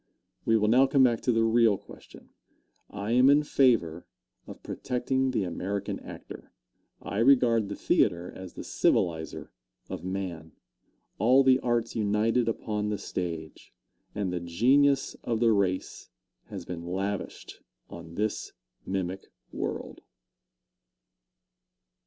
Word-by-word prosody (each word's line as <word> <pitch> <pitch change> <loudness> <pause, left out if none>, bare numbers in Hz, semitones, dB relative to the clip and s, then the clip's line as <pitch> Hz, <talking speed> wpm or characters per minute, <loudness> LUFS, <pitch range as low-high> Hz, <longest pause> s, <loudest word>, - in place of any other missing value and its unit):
We 115 - +4
will 105 -1 +1
now 130 +5 +5
come 135 0 +4
back 120 -3 +3
to 125 - +1
the 115 -1 +2
real 115 -2 +4
question. - - -15 0.6
I 100 +2 -5
am 125 +3 +5
in 145 +1 +5
favor 115 - +2 0.4
of - - -11
protecting 130 +1 -1
the 125 -5 0
American 95 +3 -3
actor. - - -11 0.5
I 100 - -3
regard 115 -4 +4
the 100 - -4
theatre 85 +1 +1
as 95 -2 -9
the - - -7
civilizer 80 -2 0 0.4
of - - -6
man. 90 -4 -5 0.7
All 125 +6 +5
the 130 -1 +5
arts 120 -2 -1
united 110 +3 +1
upon 105 -2 -2
the 105 - -1
stage, 80 -5 -6 0.4
and 100 -3 -2
the 90 - -1
genius 130 +11 +2
of 115 -2 -1
the 115 -1 +4
race 95 -3 -1 0.4
has - - -8
been 85 -2 -6
lavished 95 +3 -5 0.3
on 85 -1 -11
this 105 +2 -2 0.3
mimic 95 0 -4 0.2
world. - - -5
105 Hz, 130 wpm, -28 LUFS, 95-120 Hz, 0.7 s, now